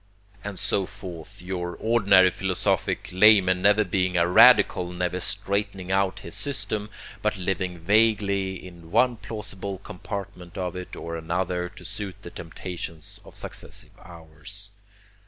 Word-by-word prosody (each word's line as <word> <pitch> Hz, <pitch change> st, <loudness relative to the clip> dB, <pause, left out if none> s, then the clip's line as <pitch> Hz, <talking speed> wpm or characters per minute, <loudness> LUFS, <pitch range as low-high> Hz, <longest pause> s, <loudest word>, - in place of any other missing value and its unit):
And 100 Hz, -2 st, -5 dB
so 95 Hz, +1 st, 0 dB
forth 85 Hz, -2 st, -9 dB
your 90 Hz, -1 st, -4 dB
ordinary 100 Hz, -5 st, +5 dB
philosophic 95 Hz, -1 st, 0 dB
layman 95 Hz, -1 st, +6 dB
never 105 Hz, +2 st, +5 dB
being 90 Hz, -1 st, 0 dB
a 85 Hz, 0 st, +4 dB
radical, 105 Hz, -3 st, +6 dB
never 90 Hz, 0 st, -2 dB
straightening 100 Hz, 0 st, -1 dB
out 95 Hz, 0 st, +1 dB
his -, -, -9 dB
system, 105 Hz, -6 st, -3 dB, 0.3 s
but 105 Hz, -1 st, 0 dB
living 95 Hz, -1 st, -2 dB
vaguely 100 Hz, 0 st, +2 dB
in 85 Hz, -2 st, -12 dB
one 120 Hz, +5 st, +3 dB
plausible 100 Hz, -3 st, -6 dB
compartment 95 Hz, -1 st, -7 dB
of 90 Hz, -2 st, -3 dB
it 90 Hz, 0 st, -7 dB
or 85 Hz, 0 st, -5 dB
another 90 Hz, +2 st, -2 dB
to 90 Hz, -, -14 dB
suit 105 Hz, -2 st, -5 dB
the -, -, -8 dB
temptations 85 Hz, -1 st, -6 dB
of -, -, -15 dB
successive -, -, -4 dB
hours. 90 Hz, +4 st, -7 dB
95 Hz, 135 wpm, -25 LUFS, 90-100 Hz, 0.3 s, layman